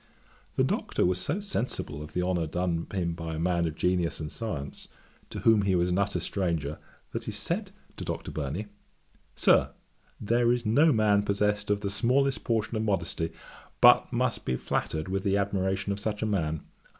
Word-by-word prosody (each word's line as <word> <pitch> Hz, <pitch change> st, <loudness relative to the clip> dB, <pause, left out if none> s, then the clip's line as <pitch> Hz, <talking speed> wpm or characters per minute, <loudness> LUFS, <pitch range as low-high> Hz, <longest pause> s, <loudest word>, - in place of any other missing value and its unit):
The -, -, +3 dB
Doctor -, -, 0 dB
was 90 Hz, 0 st, +1 dB
so 155 Hz, -, 0 dB
sensible 125 Hz, -, -3 dB
of 75 Hz, -, -9 dB
the 90 Hz, -, 0 dB
honour 90 Hz, -3 st, 0 dB
done 85 Hz, 0 st, -1 dB
him 85 Hz, -4 st, -1 dB
by 80 Hz, -1 st, -5 dB
a -, -, -4 dB
man 85 Hz, 0 st, +1 dB
of 80 Hz, -, -4 dB
genius 90 Hz, -1 st, 0 dB
and 75 Hz, -1 st, -5 dB
science, 80 Hz, -12 st, -5 dB, 0.4 s
to -, -, -6 dB
whom 110 Hz, -2 st, +5 dB
he 100 Hz, -2 st, +2 dB
was 90 Hz, 0 st, +2 dB
an 90 Hz, +2 st, +1 dB
utter 100 Hz, -2 st, 0 dB
stranger, 85 Hz, -5 st, -2 dB, 0.3 s
that -, -, -4 dB
he -, -, -3 dB
said -, -, -2 dB, 0.3 s
to -, -, -5 dB
Dr. -, -, -4 dB
Burney, 75 Hz, +7 st, -3 dB, 0.7 s
"Sir, -, -, +4 dB, 0.5 s
there 120 Hz, +2 st, +2 dB
is 120 Hz, -1 st, 0 dB
no 145 Hz, +9 st, +5 dB
man 105 Hz, -4 st, +4 dB
possessed 105 Hz, 0 st, 0 dB
of 105 Hz, 0 st, +1 dB
the 100 Hz, -2 st, -2 dB
smallest 125 Hz, +4 st, +2 dB
portion 115 Hz, -1 st, 0 dB
of 110 Hz, -, 0 dB
modesty, 85 Hz, -6 st, -1 dB, 0.5 s
but -, -, +7 dB
must -, -, 0 dB
be 65 Hz, -, -1 dB
flattered 80 Hz, +5 st, -2 dB
with 95 Hz, +1 st, -2 dB
the 100 Hz, 0 st, +2 dB
admiration 100 Hz, 0 st, 0 dB
of 100 Hz, -, -2 dB
such 105 Hz, 0 st, -2 dB
a -, -, +1 dB
man. 80 Hz, -7 st, -1 dB
95 Hz, 185 wpm, -28 LUFS, 85-105 Hz, 0.7 s, but